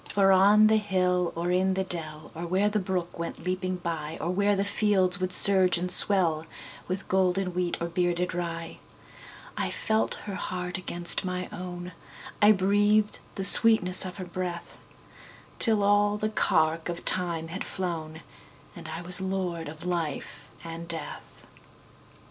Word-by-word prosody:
For 195 -1 +2
on 200 +3 +4
the 220 0 +3
hill 180 -4 -2
or 170 +1 -4
in 185 +1 -1
the 190 - -2
dell, 155 -4 -4
Or 170 +2 -8
where 190 +4 0
the 210 0 -2
brook 180 -3 -6
went 170 - -8
leaping 185 0 -4
byOr 165 -1 -6
where 200 +2 0
the 195 - -2
fields 195 -3 +1
would 185 0 -4
surge 185 -1 +8
and 180 +1 -3
swellWith 180 0 +3
golden 185 0 -1
wheat 180 -1 -3
or 170 - -4
bearded 175 +1 -3
rye,I 170 - -9
felt 220 0 -3
her 205 - -7
heart 180 -1 -6
against 175 0 -3
my 180 -1 -5
own,I 180 +3 -4
breathed 205 +2 0 0.2
the 195 - -5
sweetness 195 -3 +7
of 185 -1 -8
her 185 - -8
breath, 175 -1 -8 0.8
Till 220 -3 0
all 205 +1 +1
the 215 +1 -3
cark 160 -5 -1
of 175 0 -8
time 170 -3 -2
had 190 +4 -7
flown, 165 -4 -7 0.5
And - - -12
I 165 +2 -8
was 180 +2 +1
lord 185 -4 -5
of 160 +3 -12
life 160 -4 -6
and 165 0 -9
death. 165 -2 -9
180 Hz, 150 wpm, -25 LUFS, 170-195 Hz, 0.8 s, surge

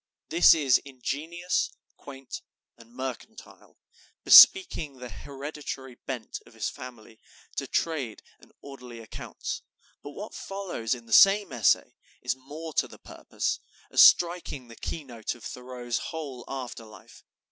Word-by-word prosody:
This 170 +1 +7
is 140 -6 +3
ingenious, 150 +7 -3 0.3
quaint, 135 -2 -9 0.3
and 115 0 -18
mercantile, 130 - -9 0.5
bespeaking 165 - +7
the 125 -1 -8
hereditary 140 +2 -7
bent 120 -2 -6
of - - -18
his - - -2
family 115 -3 -11 0.4
to - - -2
trade 140 -10 -2 0.2
and - - -20
orderly 125 -4 -10
accounts; 115 - -7 0.4
but 145 - -9
what 210 +2 -7
follows 185 - -3
in 120 -1 -13
the 115 - -5
same 195 -5 +6
essay 115 -4 +2 0.3
is - - -2
more 150 +5 -9
to - - -9
the - - -14
purpose, - - -4 0.3
as - - +6
striking 170 -7 +4
the 115 - -11
key 160 - -5
note 120 -5 -6
of 120 - -16
Thoreau's 125 +1 -5
whole 140 -7 -7
after 125 -3 -6
life. 105 -3 -16
135 Hz, 135 wpm, -27 LUFS, 120-160 Hz, 0.5 s, This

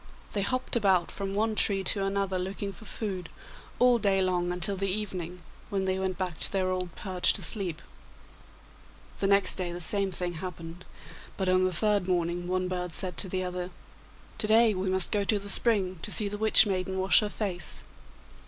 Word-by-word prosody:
They 205 - 0
hopped 255 +6 -1
about 190 -6 +2
from 195 0 -4
one 220 +2 +1
tree 200 -2 +1
to 195 +1 0
another 195 -1 0
looking 195 +2 -4
for 220 - -14
food, 190 -6 -5 0.5
all 245 -1 +5
day 195 -2 +2
long 180 -2 +1
until 180 +3 -1
the 195 +1 -2
evening, 180 -3 -4 0.3
when 195 -2 -1
they 190 0 0
went 190 -1 -2
back 180 -4 -3
to - - -2
their 185 -2 0
old 180 -2 -3
perch 185 -3 +1
to - - -4
sleep. 180 -7 -2 1.4
The 195 - +1
next 200 -1 +5
day 180 -2 -2
the 175 - -5
same 195 +3 +1
thing 175 -1 -3
happened, 175 0 -7 0.5
but 190 - -1
on 185 0 +4
the 185 - +1
third 205 +1 +1
morning 175 -1 -1
one 185 0 0
bird 180 -2 -3
said 180 +3 -2
to 190 - -2
the 185 0 -1
other, 180 0 -4 0.7
'To 210 - 0
day 220 0 +5
we 190 0 -2
must 190 -1 +1
go 205 -1 +1
to 210 +1 +1
the 200 0 -4
spring 190 -7 +2
to - - -4
see 210 - +4
the 205 +1 -5
Witch 220 0 +6
maiden 190 -1 -2
wash 190 +1 +6
her 210 - -1
face. 185 -6 -2
190 Hz, 200 wpm, -28 LUFS, 180-200 Hz, 1.4 s, Witch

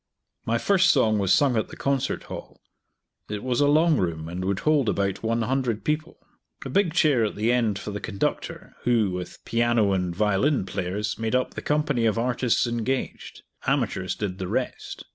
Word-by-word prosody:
My 115 +1 +2
first 190 +7 +3
song 110 -6 +3
was 95 -2 +1
sung 140 -4 +4
at 110 - 0
the - - -11
Concert 135 -1 -1
Hall. - - -9 0.7
It 105 -1 -4
was 125 +1 0
a 145 - +4
long 155 +1 +4
room, 80 -4 -2
and 90 +2 -4
would 95 0 -1
hold 150 -6 +2
about 100 -1 -1
100 115 +1 -1
people. 155 +2 -2 0.5
A - - -4
big 195 -4 +2
chair 145 -9 +4
at 105 - -3
the 110 +3 +1
end 115 -5 +1
for 105 - -6
the 105 - -4
conductor, 100 -3 -3
who, 115 -5 +2
with 90 0 -7
piano 115 -3 +2
and 90 -2 -1
violin 105 - +2
players, 100 +3 -3
made 115 +2 -1
up 125 - 0
the - - -5
company 145 -6 +1
of 110 - +1
artists 125 +1 +1
engaged; 120 +2 -3 0.2
amateurs 95 -1 0
did 95 -3 -4
the 95 - -3
rest. - - -4
115 Hz, 180 wpm, -25 LUFS, 100-135 Hz, 0.7 s, sung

